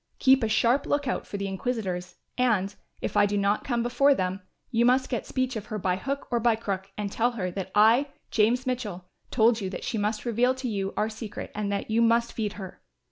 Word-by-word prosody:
Keep 265 0 +5
a 225 - +1
sharp 235 +5 +2
look 290 -1 0
out 250 - -2
for 205 - -5
the 200 - -3
inquisitors 190 -3 -3 0.2
and, 210 -6 +1 0.3
if - - -3
I 205 0 +5
do 205 0 -1
not 200 +1 +1
come 240 -3 0
before 275 +4 +4
them, 185 -1 -2 0.3
you 230 -1 +3
must 255 +2 +3
get 240 - -3
speech 255 -1 -1
of 215 -1 -5
her 215 - -4
by 185 -2 0
hook 275 +9 -4
or 240 - +2
by 230 0 +3
crook 195 -3 -4
and 205 -1 -3
tell 240 +3 +1
her 185 -6 -3
that 190 0 -5
I, 225 +7 +5 0.2
James 235 +4 +2
Mitchell, 215 -8 -3 0.2
told 225 -1 +3
you 190 - -2
that 185 - -6
she 225 - -2
must 210 +2 -1
reveal 245 +2 +2
to 260 0 -4
you 200 -3 -2
our 215 - +2
secret 220 -1 -7
and 205 -1 -2
that 200 +2 -3
you 225 +1 +3
must 235 0 +3
feed 210 -3 -2
her. 190 -3 -9
220 Hz, 230 wpm, -27 LUFS, 200-245 Hz, 0.3 s, Keep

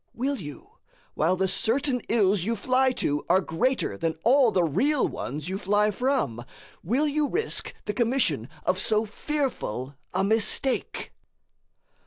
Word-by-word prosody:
Will 270 +4 -1
you, 145 - -10 0.3
while 165 +4 +2
the 190 +1 +1
certain 250 +6 0
ills 200 -5 +3
you 230 +4 0
fly 255 +4 +2
to 145 - -1
are 185 +2 +5
greater 185 - -1
than 165 -1 -1
all 255 +1 +5
the 185 -4 +2
real 250 - +2
ones 150 +4 -5
you 190 +1 -3
fly 205 +2 +2
from 225 - -1 0.4
will 255 - +1
you 295 0 0
risk 445 +4 -2
the 210 - -2
commission 215 - +1 0.2
of 185 - +1
so 215 +2 +1
fearful 220 - -3 0.2
a - - 0
mistake? 220 +5 0
215 Hz, 145 wpm, -26 LUFS, 175-260 Hz, 0.4 s, are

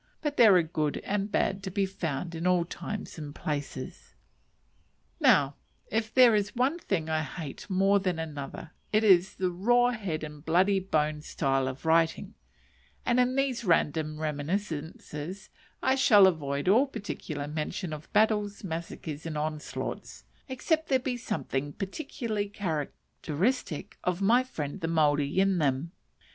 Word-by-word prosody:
But 295 -1 -1
there 220 -7 +7
are 175 - +5
good 155 -2 -1
and 205 0 -2
bad 195 -1 +1
to 195 - -4
be 195 +1 0
found 170 -3 -4
in 165 +2 -2
all 180 -2 +3
times 205 +1 -6
and 145 -2 -7
places. 145 -3 -5 1.0
Now 140 -1 +4 0.3
if 220 0 -1
there 250 -3 +7
is 205 +1 0
one 265 +8 +1
thing 175 - -2
I 155 0 0
hate 155 -1 -7
more 195 +1 +3
than 185 -3 -1
another 155 0 -6 0.2
it 215 +1 +3
is 190 -3 +5
the 185 -1 -1
raw 240 +7 +3
head 190 -10 -3
and 150 -1 -8
bloody 185 +5 +3
bones 155 -4 -1
style 135 -1 0
of 130 +3 -6
writing, 165 +5 +2 0.7
and 245 0 +3
in 250 +1 +2
these 265 -3 0
random 155 -4 +1
reminiscences 155 +2 -4 0.3
I 260 - +4
shall 220 -7 +7
avoid 145 -4 0
all 235 +9 +5
particular 155 - -5
mention 155 +3 -3
of 155 +1 -9
battles, 210 -1 +2
massacres, 165 -3 -5
and 155 -2 -4
onslaughts; 155 0 -4 0.3
except 315 +5 0
there 265 - +5
be 255 -1 -3
something 145 - -3
particularly 210 -1 -4
characteristic 165 - -3
of 180 0 0
my 230 +6 +4
friend 150 - -5
the 165 - -1
Maori 150 -1 +2
in 195 -2 +3
them. 145 +2 0
180 Hz, 150 wpm, -29 LUFS, 155-210 Hz, 1.0 s, there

